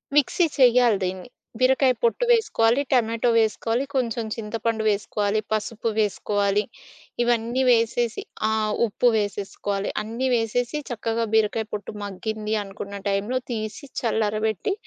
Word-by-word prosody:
Mixie 295 Hz, +4 st, +3 dB
చెయ్యాలి 245 Hz, -4 st, +5 dB
దీన్ని. 185 Hz, +5 st, -5 dB, 0.3 s
బీరకాయ 260 Hz, 0 st, +4 dB
పొట్టు 475 Hz, +1 st, +2 dB
వేసుకోవాలి, 260 Hz, -, +3 dB
టమాటో 230 Hz, -2 st, +2 dB
వేసుకోవాలి, 225 Hz, +2 st, +1 dB
కొంచెం 235 Hz, -3 st, 0 dB
చింతపండు 225 Hz, 0 st, -2 dB
వేసుకోవాలి, 205 Hz, 0 st, 0 dB
పసుపు 220 Hz, +1 st, -1 dB
వేసుకోవాలి 205 Hz, -1 st, +1 dB, 0.6 s
ఇవన్నీ 240 Hz, +2 st, +1 dB
వేసేసి 235 Hz, 0 st, +2 dB, 0.3 s
ఆహ్, 215 Hz, -1 st, 0 dB
ఉప్పు 235 Hz, +2 st, +1 dB
వేసేసుకోవాలి. 205 Hz, -1 st, -2 dB
అన్నీ 230 Hz, +5 st, -2 dB
వేసేసి 240 Hz, +5 st, -1 dB
చక్కగా 230 Hz, -1 st, -1 dB
బీరకాయ 220 Hz, 0 st, +2 dB
పొట్టు 210 Hz, 0 st, -5 dB
మగ్గింది 215 Hz, +2 st, -3 dB
అనుకున్న 200 Hz, 0 st, -7 dB
టైంలో 205 Hz, +6 st, 0 dB
తీసి 220 Hz, +4 st, -5 dB
చల్లరబెట్టి 220 Hz, -, 0 dB
225 Hz, 115 wpm, -24 LUFS, 210-240 Hz, 0.6 s, చెయ్యాలి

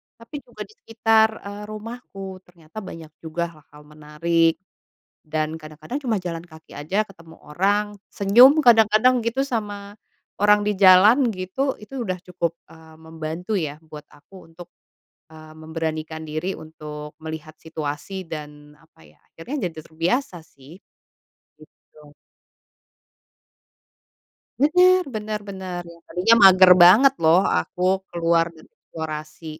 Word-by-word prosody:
Tapi 230 Hz, +6 st, -13 dB
juga -, -, -10 dB
di -, -, -18 dB
sekitar, 225 Hz, -, +2 dB, 0.2 s
eee, 205 Hz, +1 st, -8 dB
rumahku 215 Hz, -4 st, -9 dB
ternyata 170 Hz, +3 st, -12 dB
banyak 165 Hz, -5 st, -10 dB
juga 170 Hz, +1 st, -4 dB
hal-hal 150 Hz, -1 st, -18 dB
menarik 155 Hz, +2 st, 0 dB, 0.7 s
dan 155 Hz, 0 st, -3 dB
kadang-kadang 155 Hz, -, -8 dB
cuma 225 Hz, -5 st, 0 dB
jalan 170 Hz, -2 st, -6 dB
kaki 160 Hz, -2 st, -16 dB
aja 190 Hz, +9 st, -2 dB
ketemu 165 Hz, -4 st, -17 dB
orang 205 Hz, +6 st, -1 dB, 0.2 s
senyum 230 Hz, +7 st, +6 dB
kadang-kadang 230 Hz, -1 st, +4 dB
gitu 265 Hz, +4 st, -1 dB
sama 205 Hz, -4 st, -5 dB, 0.4 s
orang 210 Hz, 0 st, +3 dB
di 210 Hz, -, 0 dB
jalan 205 Hz, +7 st, +6 dB
gitu. 210 Hz, +9 st, -3 dB
Itu 240 Hz, +4 st, -7 dB
udah 185 Hz, -4 st, -4 dB
cukup, 175 Hz, -2 st, -3 dB, 0.2 s
eee, 160 Hz, -1 st, -17 dB
membantu 160 Hz, +5 st, -5 dB
ya 155 Hz, -5 st, -3 dB
buat 155 Hz, -2 st, -12 dB
aku 165 Hz, +3 st, -17 dB
untuk, 175 Hz, +1 st, -12 dB, 0.6 s
eee, 155 Hz, 0 st, -14 dB
memberanikan 160 Hz, 0 st, -5 dB
diri 155 Hz, +5 st, -4 dB
untuk 150 Hz, -1 st, -10 dB
melihat 160 Hz, -1 st, -8 dB
situasi 160 Hz, +4 st, -6 dB
dan, 150 Hz, -2 st, -9 dB
apa 150 Hz, -, -23 dB
ya, 75 Hz, -, -25 dB
akhirnya 185 Hz, -, -5 dB
jadi 160 Hz, -, -15 dB
terbiasa 175 Hz, -, -2 dB
sih 140 Hz, -1 st, -17 dB, 1.2 s
gitu. 150 Hz, -1 st, -18 dB, 2.4 s
Bener, 360 Hz, +6 st, +4 dB
bener 215 Hz, 0 st, -4 dB
bener 185 Hz, -2 st, -6 dB, 0.2 s
tadinya 190 Hz, +6 st, +3 dB
mager 185 Hz, -1 st, +8 dB
banget 230 Hz, +10 st, +7 dB
loh 160 Hz, +3 st, +5 dB, 0.2 s
aku 180 Hz, -, -6 dB, 0.3 s
keluar 170 Hz, -1 st, +1 dB
dan 160 Hz, -, -17 dB
eksplorasi. 155 Hz, 0 st, -8 dB
175 Hz, 125 wpm, -22 LUFS, 155-210 Hz, 2.4 s, mager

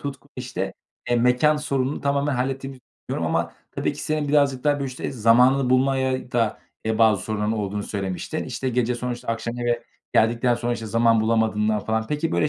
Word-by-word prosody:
Tutkun, 135 Hz, -3 st, -7 dB
işte, -, -, -4 dB, 0.4 s
eee, 120 Hz, -, +4 dB
mekân 125 Hz, +6 st, +4 dB
sorununu 140 Hz, -2 st, -1 dB
tamamen 140 Hz, 0 st, +1 dB
hallettiğimizi 135 Hz, +1 st, -3 dB, 0.3 s
düşünüyorum. -, -, -1 dB
Ama -, -, -1 dB, 0.2 s
tabii -, -, -1 dB
ki -, -, -8 dB
senin 155 Hz, -1 st, -1 dB
birazcık 140 Hz, -3 st, +2 dB
daha, 145 Hz, -1 st, +4 dB
böyle, 140 Hz, -, -3 dB
işte, 130 Hz, 0 st, -5 dB
zamanını 125 Hz, +3 st, +4 dB
bulmaya 130 Hz, -1 st, +1 dB
da, 115 Hz, -3 st, +1 dB, 0.3 s
eee, 110 Hz, 0 st, 0 dB
bazı 110 Hz, -4 st, +4 dB
sorunların 105 Hz, +1 st, -1 dB
olduğunu 105 Hz, -1 st, -2 dB
söylemiştin. 95 Hz, -4 st, -4 dB
İşte, 130 Hz, -, -3 dB
gece 125 Hz, 0 st, +1 dB
sonuçta 120 Hz, 0 st, -5 dB
akşam 115 Hz, +1 st, -2 dB
eve 120 Hz, -1 st, 0 dB, 0.3 s
geldikten 120 Hz, +2 st, +3 dB
sonra, 120 Hz, 0 st, -2 dB
işte, 115 Hz, -2 st, -4 dB
zaman 115 Hz, +1 st, +3 dB
bulamadığından 110 Hz, -1 st, +1 dB
falan. 110 Hz, +1 st, -1 dB
Peki, 150 Hz, +2 st, -1 dB
böyle, 150 Hz, -, +2 dB
120 Hz, 180 wpm, -23 LUFS, 110-135 Hz, 0.4 s, eee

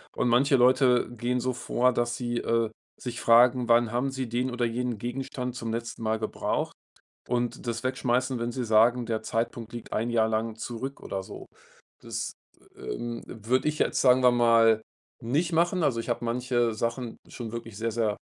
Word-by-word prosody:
Und -, -, +1 dB
manche 130 Hz, +3 st, +4 dB
Leute 125 Hz, -1 st, +4 dB
gehen 120 Hz, +1 st, -2 dB
so 130 Hz, +1 st, -1 dB
vor, 125 Hz, 0 st, +1 dB
dass 120 Hz, 0 st, -1 dB
sie, 120 Hz, -1 st, -2 dB
äh, 115 Hz, -1 st, +1 dB, 0.3 s
sich 120 Hz, -1 st, -5 dB
fragen, 120 Hz, +1 st, +5 dB
wann 115 Hz, -1 st, +4 dB
haben 125 Hz, +3 st, 0 dB
sie 130 Hz, -1 st, -3 dB
den 125 Hz, +3 st, -1 dB
oder 120 Hz, 0 st, 0 dB
jenen 120 Hz, 0 st, -2 dB
Gegenstand 125 Hz, +1 st, -4 dB
zum 115 Hz, -2 st, -4 dB
letzten 115 Hz, 0 st, -5 dB
Mal 110 Hz, 0 st, 0 dB
gebraucht? 110 Hz, -, -2 dB, 0.6 s
Und 120 Hz, 0 st, -2 dB
das 115 Hz, 0 st, -2 dB
wegschmeißen, 130 Hz, 0 st, 0 dB
wenn 120 Hz, +1 st, -2 dB
sie 125 Hz, 0 st, -3 dB
sagen, 115 Hz, +2 st, +4 dB
der 110 Hz, -1 st, -2 dB
Zeitpunkt 115 Hz, +1 st, -3 dB
liegt 120 Hz, -, -8 dB
1 115 Hz, +2 st, 0 dB
Jahr 110 Hz, -1 st, +2 dB
lang 110 Hz, 0 st, -1 dB
zurück 125 Hz, +4 st, -6 dB
oder 95 Hz, -1 st, -4 dB
so. -, -, -10 dB, 0.5 s
Das, -, -, -4 dB, 0.4 s
ähm, 120 Hz, -, -5 dB
würde 120 Hz, +6 st, 0 dB
ich 150 Hz, -, -2 dB
jetzt, -, -, +1 dB
sagen 130 Hz, -1 st, +5 dB
wir 125 Hz, -, +7 dB
mal, 115 Hz, -2 st, +5 dB, 0.4 s
nicht 150 Hz, +9 st, 0 dB
machen. 175 Hz, +2 st, +2 dB
Also, 115 Hz, -5 st, +1 dB
ich 115 Hz, -, -8 dB
habe 120 Hz, 0 st, -1 dB
manche 120 Hz, -1 st, 0 dB
Sachen 115 Hz, +1 st, -3 dB
schon 115 Hz, -3 st, -7 dB
wirklich 115 Hz, -2 st, -7 dB
sehr, 115 Hz, +1 st, -2 dB
sehr 110 Hz, -2 st, 0 dB
120 Hz, 185 wpm, -27 LUFS, 115-125 Hz, 0.6 s, wir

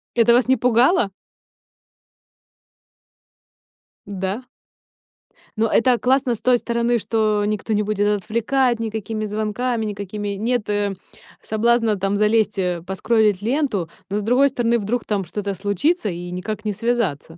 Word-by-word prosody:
Это 235 Hz, 0 st, +5 dB
вас 245 Hz, +1 st, +3 dB
не 260 Hz, -1 st, +4 dB
пугало? 245 Hz, -, +3 dB, 2.9 s
Да? 195 Hz, +4 st, -4 dB, 1.1 s
Но 225 Hz, 0 st, +1 dB
это 245 Hz, +1 st, +3 dB
классно 260 Hz, -1 st, +2 dB
с 225 Hz, -, -6 dB
той 250 Hz, -1 st, +4 dB
стороны, 235 Hz, 0 st, 0 dB
что 215 Hz, -2 st, 0 dB
никто 215 Hz, +1 st, -2 dB
не 210 Hz, -, +1 dB
будет 205 Hz, 0 st, 0 dB
отвлекать 230 Hz, +4 st, 0 dB
никакими 220 Hz, -1 st, -3 dB
звонками, 220 Hz, +2 st, -2 dB
никакими 205 Hz, 0 st, -5 dB
нет, 220 Hz, +3 st, -1 dB
э, 205 Hz, -1 st, 0 dB, 0.5 s
соблазна 230 Hz, 0 st, +1 dB
там 195 Hz, +1 st, -1 dB
залезть, 215 Hz, 0 st, +2 dB
э, 180 Hz, -3 st, -1 dB
поскролить 210 Hz, +1 st, +1 dB
ленту, 230 Hz, -, 0 dB, 0.2 s
но 200 Hz, -, -1 dB
с 210 Hz, -, -2 dB
другой 255 Hz, +5 st, +4 dB
стороны, 235 Hz, -2 st, +1 dB
вдруг 225 Hz, +3 st, -2 dB
там 200 Hz, -3 st, -1 dB
что-то 200 Hz, +3 st, -4 dB
случится 205 Hz, -, 0 dB
и 175 Hz, 0 st, -6 dB
никак 210 Hz, +4 st, -5 dB
не 210 Hz, -, 0 dB
связаться. 205 Hz, -, -2 dB
215 Hz, 135 wpm, -21 LUFS, 205-235 Hz, 2.9 s, Это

